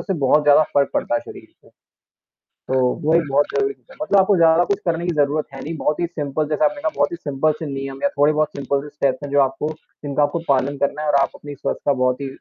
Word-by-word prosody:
उससे 195 - -2
बहुत 150 +3 +4
ज़्यादा 150 +1 +6
फ़र्क 140 -1 +3
पड़ता 120 - 0
है 120 - +1
शरीर - - -12 0.2
को। - - -21 1.1
तो 130 - +3 0.3
वही 165 +1 +5
बहुत 145 +2 +3
ज़रूरी 410 -1 +1
चीज़ - - -34
है, - - -14
मतलब 200 -10 +3
आपको 195 +1 +4
ज़्यादा 165 +1 +5
कुछ 200 0 -1
करने 170 0 -1
की 175 - 0
ज़रूरत 150 +1 +1
है 135 - -8
नहीं, 165 +2 -5
बहुत 150 0 -1
ही 175 - +1
सिंपल 150 -2 -3
जैसे 150 - +2
आपने 295 -1 -1
कहा 315 - 0
बहुत - - +1
ही - - -3
सिंपल 150 -1 0
से 160 - -5
नियम 135 0 -5
है, 190 - +3
थोड़े-बहुत 150 +1 +3
सिंपल 140 0 -1
से 150 - -9
स्टेप्स 135 -2 0
हैं 145 - -6
जो 145 - +3
आपको 135 +3 -1 0.3
जिनका 145 +1 +1
आपको 145 +4 0
पालन 140 +1 +1
करना 150 - -4
है 155 - -3
और 145 - +2
आप - - +1
अपनी 145 -1 -9
स्वस्थ - - -3
का 145 - +3
बहुत 125 +1 +1
ही 140 - -3
150 Hz, 260 wpm, -21 LUFS, 140-165 Hz, 1.1 s, ज़्यादा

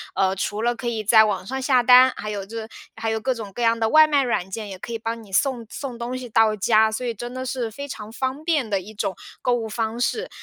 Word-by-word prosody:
呃， 190 -1 +2
除 205 +2 -2
了 240 +1 +1
可 240 +1 -6
以 225 -2 -2
在 220 +1 +6
网 195 -3 -2
上 265 +5 -4
下 255 -2 +3
单， 255 +1 +7
还 215 - -6
有 200 -2 -4
这 225 +1 -6 0.3
还 225 0 -3
有 220 0 -1
各 260 +4 0
种 220 -4 -8
各 245 - -5
样 230 0 +3
的 225 -1 +1
外 310 0 +7
卖 290 -2 +2
软 190 -7 -1
件， 210 +1 -6
也 190 -1 -8
可 235 - -7
以 - - -1
帮 225 +1 -4
你 200 -3 -15
送 250 +1 +1
送 260 -3 -6
东 240 +2 -4
西 250 -1 -8
到 220 0 +3
家， 215 +2 +3
所 220 +3 -4
以 235 - -1
真 240 +3 -7
的 255 0 -5
是 250 -3 -2
非 280 +6 -8
常 215 -4 -7
方 260 +4 -3
便 300 -9 +1
的 200 -2 +1
一 200 +4 -11
种 200 -2 -2 0.3
购 250 - +1
物 230 -2 -1
方 225 +1 -3
式。 445 - -1
230 Hz, 295 characters per minute, -23 LUFS, 215-255 Hz, 0.3 s, 单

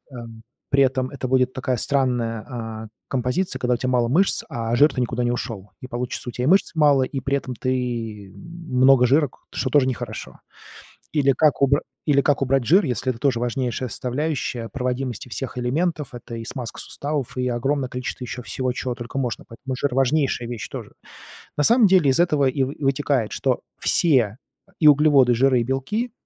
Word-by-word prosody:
эм, 115 -2 -10 0.3
при 140 0 +4
этом 130 -1 0
это 130 -1 -5
будет 130 0 +2
такая 130 -1 -1
странная, 120 -4 0
а, 115 -3 -6 0.2
композиция, 130 +4 -1
когда 125 -1 +1
у - - -3
тя 130 - -2
мало 120 -2 +2
мышц, 175 +11 +2
а 115 0 -3
жир-то 145 0 +4
никуда 120 0 -1
не 120 - +1
ушёл, 110 -5 -5
и 130 - -7
получится: 125 0 -4
у - - -5
тя 125 - -4
и - - +1
мышц 190 +5 +4
мало, 145 -4 +4
и 135 +1 -3
при 140 +1 0
этом 130 -2 -6
ты 115 -6 -3
много 135 -7 +2
жира, 145 +4 +3
к - - -22
что 130 - -2
тоже 135 0 +4
нехорошо. 130 - -5 0.7
Или 140 -3 +3
как 150 +2 +2
убра 140 +1 +3 0.2
или 140 -2 +4
как 145 -2 +2
убрать 135 -1 +2
жир, 180 - +5
если 130 0 -1
это 120 - -4
тоже 130 -2 +1
важнейшая 125 +1 -2
составляющая 125 -1 -3
проводимости 125 -1 -3
всех 125 +1 -5
элементов? 150 +3 -1
Это 120 -1 -8
и 115 - -6
смазка 120 -1 -6
суставов, 145 -4 -4
и 125 0 0
огромное 130 +3 -1
количество 125 0 -5
ещё 125 0 -6
всего, 130 +1 -2
чего 125 0 -3
только 120 +2 -6
можно. 125 -4 -3
Поэтому 130 +3 -6
жир- 135 0 -1
важнейшая 135 -2 +1
вещь 110 -7 -5
тоже. - - -8 0.6
На 150 - +2
самом 235 - +6
деле, 180 -7 +4
из 130 - +2
этого 150 -5 +3
и 135 +1 0
вы 135 +2 -6
вытекает, 135 -4 0
что 130 -2 0 0.2
все- 125 - +2 0.4
и 155 - +7
углеводы, 145 -4 +5
и - - +3
жиры, 130 0 +3
и - - 0
белки- 140 - -2
130 Hz, 190 wpm, -22 LUFS, 120-140 Hz, 0.7 s, и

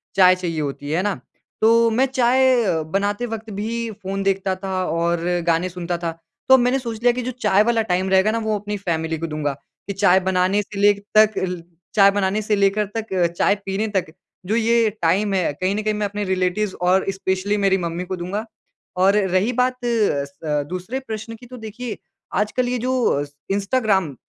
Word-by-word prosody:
चाय 185 -1 +6
चाहिए 170 -3 -3
होती 145 0 -5
है, 155 - 0
है 185 - 0
ना, 205 -1 -1 0.4
तो 230 +1 +5
मैं 255 +4 +3
चाय 255 -1 +3 0.3
बनाते 205 +4 0
वक़्त 225 -1 -6
भी 230 +2 -3
फ़ोन 195 -1 -5
देखता 195 -1 0
था 190 -1 -1
और 170 +1 0 0.2
गाने 170 +2 +2
सुनता 175 -1 -4
था। 170 -1 -3 0.4
तो 265 - +9
मैंने 250 +2 +2
सोच 230 -3 -6
लिया 245 - +6
कि 250 - -3
जो 255 +1 -3
चाय 210 -4 +2
वाला 230 0 +2
टाइम 185 +2 +1
रहेगा 190 +3 +4
ना, 230 - -1
वो 220 -1 -1
अपनी 205 0 -4
फ़ैमिली 160 -4 -2
को 165 - -4
दूँगा, 150 -2 -2 0.3
कि 200 - -3
चाय 190 -1 +4
बनाने 190 +2 +1
से 200 0 -8
लेग 205 0 +4 0.2
तक 215 0 +5
अल 180 -2 -2 0.3
चाय 200 -2 +7
बनाने 205 +1 0
से 210 0 0
लेकर 200 +1 +2
तक 225 -1 -3 0.3
चाय 200 - +3
पीने 195 +3 -1
तक 175 -4 -2 0.3
जो 215 +5 0
ये 230 0 +3
टाइम 195 +5 +2
है, 185 -5 +1
कहीं 185 +6 -1
न 215 - -1
कहीं 215 0 0
मैं 210 0 -1
अपने 205 +1 -4
रिलेटिव्स 185 +2 0
और 185 +2 +3
स्पेशली 190 +1 -1
मेरी 195 -1 +2
मम्मी 170 -1 -3
को 185 - -4
दूँगा। 185 +5 -4 0.5
और 195 +2 +4
रही 185 +6 +2
बात 250 +1 +1
स 150 -9 -1
दूसरे 185 +9 -4
प्रश्न 225 -2 -7
की 245 - -14
तो 250 +1 -10
देखिए, 225 +1 -6 0.4
आजकल 220 +4 0
ये 250 - 0
जो 245 - +1
स 145 - -18 0.2
इंस्टाग्राम 195 - +1
200 Hz, 200 wpm, -21 LUFS, 185-225 Hz, 0.5 s, तो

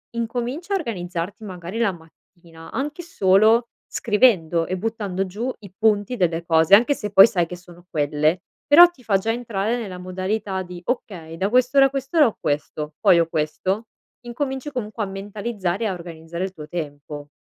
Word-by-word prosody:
incomincia 245 - -3
a - - +3
organizzarti, 185 - -5
magari, 180 +1 -7
la 230 -4 +2
mattina 165 0 -16
anche 295 +5 -3
solo 220 - +3 0.2
scrivendo 190 -8 +2
e 185 - -2
buttando 200 -2 -2
giù 215 +7 -4
i 200 -4 -13
punti 215 +1 +2
delle 170 -3 0
cose, 160 +2 +3
anche 240 +7 +4
se 210 -5 -5
poi 195 +1 +9
sai 185 -7 0
che 180 - -7
sono 175 0 -16
quelle. 150 +3 +1 0.3
Però 345 +4 +10
ti 310 -8 -21
fa 205 -4 +2
già 220 +4 -1
entrare 230 -1 -2
nella 200 -6 -6
modalità 190 +2 -3
di: 180 -1 -10
"Okay, 180 -10 -4
da 195 +3 0
quest'ora 255 +3 +4
a - - +3
quest'ora 275 +2 +2
ho 225 - -5
questo, 150 0 -3
poi 170 - +6
ho 165 - +2
questo". 185 +8 -2 0.4
Incominci 265 +3 -4
comunque 220 -4 -4
a - - -3
mentalizzare 195 0 -4
e - - +2
a 195 - -1
organizzare 170 0 -7
il 190 - -7
tuo 150 -4 -10
tempo. 145 -3 -6
195 Hz, 175 wpm, -22 LUFS, 175-235 Hz, 0.4 s, Però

